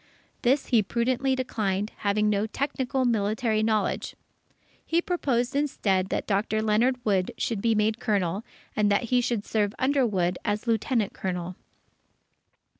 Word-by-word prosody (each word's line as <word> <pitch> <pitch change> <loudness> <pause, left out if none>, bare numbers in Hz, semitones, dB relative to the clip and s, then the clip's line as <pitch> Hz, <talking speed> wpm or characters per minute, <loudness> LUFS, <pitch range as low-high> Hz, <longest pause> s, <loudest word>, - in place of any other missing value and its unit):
This 265 +4 +2
he 235 -4 +5
prudently 250 +5 0
declined, 210 -5 -2
having 210 +1 +1
no 210 +1 +1
technical 265 +1 -1
military 220 0 +1
knowledge. 215 -1 0 0.7
He 330 - +1
proposed 270 -8 -1
instead 195 -10 +1
that - - -2
Dr. 215 +1 0
Leonard 240 +4 +1
Wood 190 -4 +2
should 220 -4 -2
be 230 0 +2
made 215 +1 +1
Colonel, 200 -4 0 0.3
and 210 -1 +2
that 200 - +2
he 250 - +5
should 235 -4 -1
serve 210 -1 0
under 270 +1 +2
Wood, 180 -6 0
as 210 +1 -1
Lieutenant 225 -1 0
Colonel. 180 -1 -4
220 Hz, 140 wpm, -26 LUFS, 205-250 Hz, 0.7 s, he